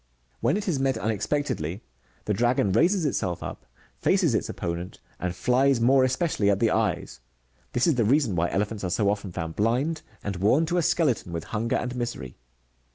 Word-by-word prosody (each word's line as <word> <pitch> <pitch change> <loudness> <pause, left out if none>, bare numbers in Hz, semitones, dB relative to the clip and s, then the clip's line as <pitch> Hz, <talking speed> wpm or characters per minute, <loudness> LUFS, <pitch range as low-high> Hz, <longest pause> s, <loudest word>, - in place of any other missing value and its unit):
'Wlien - - +2
it 210 0 -4
is 160 -7 0
met 135 0 +1
unexpectedly, 110 - -2 0.4
the 105 - 0
dragon 120 -2 +2
raises 170 - +3
itself 90 - -1
up, 65 - -8 0.3
faces - - +2
its - - 0
opponent, 85 +1 -5 0.2
and 90 -1 -3
files 130 +4 +2
more 130 +3 +4
especially 130 - +1
at 100 -1 +2
the 115 0 +3
eyes; - - -1 0.5
this 120 - +2
is 165 - +4
the 120 -3 +1
reason 125 -2 +2
why 85 +1 +1
elephants 105 +1 -2
are 90 - -1
so 100 +2 +2
often 100 -2 -4
found 80 -2 -5
blind, 130 +9 0 0.2
and 100 -2 -3
worn 110 - +3
to 175 +3 -1
a - - +3
skeleton 135 - +1
;tvith 85 -2 -3
hunger 115 +2 -2
and 125 0 -2
misery. 120 - -4
115 Hz, 185 wpm, -26 LUFS, 95-135 Hz, 0.5 s, more